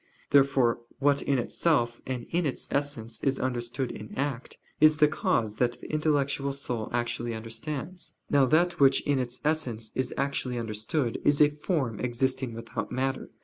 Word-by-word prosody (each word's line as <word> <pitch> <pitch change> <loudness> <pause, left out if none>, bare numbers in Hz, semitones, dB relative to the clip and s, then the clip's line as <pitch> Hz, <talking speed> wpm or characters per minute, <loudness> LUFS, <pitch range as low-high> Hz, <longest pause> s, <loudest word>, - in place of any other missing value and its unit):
Therefore 135 -4 +4 0.2
what 140 +1 +3
in 140 - +1
itself 120 -2 +1
and 125 -2 -3
in 175 +1 +1
its 135 - -4
essence 135 -6 -2
is 135 -1 +1
understood 125 +1 -2
in 105 0 -9
act, 135 -2 -3 0.2
is 155 0 +6
the 150 -1 +6
cause 115 -7 0
that 120 -1 +2
the - - -9
intellectual 140 -2 +1
soul 125 -5 -3
actually 120 -1 -1
understands. 140 +10 -5
Now 140 -2 +4
that 175 +6 +2
which 135 -1 +5
in 140 -2 +1
its 125 -1 -3
essence 125 -8 -1
is 130 -1 -1
actually 135 -3 -1
understood 115 +3 -2
is 145 -1 +3
a 150 0 +6
form 150 - -2
existing 125 0 -1
without 115 0 -5
matter. 130 +1 -1
130 Hz, 160 wpm, -28 LUFS, 120-145 Hz, 0.2 s, is